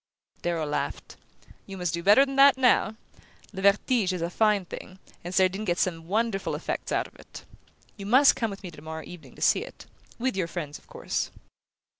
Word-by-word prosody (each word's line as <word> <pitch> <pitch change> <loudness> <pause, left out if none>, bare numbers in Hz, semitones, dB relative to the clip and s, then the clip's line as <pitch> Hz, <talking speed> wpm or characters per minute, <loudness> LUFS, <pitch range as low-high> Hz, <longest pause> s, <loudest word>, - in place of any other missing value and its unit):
Darrow 170 -2 -1
laughed. 150 - -4 0.5
"You 195 - -8
must 180 -2 -2
do 170 - -2
better 205 +9 +6
than 270 0 -6
that 275 0 +7
now. 245 -4 +3 0.6
'Le 190 - -5
Vertige' 200 0 +2
is 180 - -4
a 170 - -2
fine 210 -2 +2
thing, 185 +2 -9 0.3
and 175 - -6
Cerdine 190 +2 +2
gets 175 -4 0
some 165 -3 -4
wonderful 215 0 -1
effects - - -4
out - - +1
of - - -15
it. - - -12 0.5
You 200 -1 -7
must 265 +6 +6
come 235 -4 -1
with 200 0 -9
me 180 - -7
tomorrow 160 +1 -8
evening 175 -2 -12
to - - -5
see - - +4
it - - -12 0.3
with 255 0 -1
your 185 -3 -1
friends, 155 -4 -6
of - - -27
course. - - -3
190 Hz, 195 wpm, -26 LUFS, 175-220 Hz, 0.6 s, that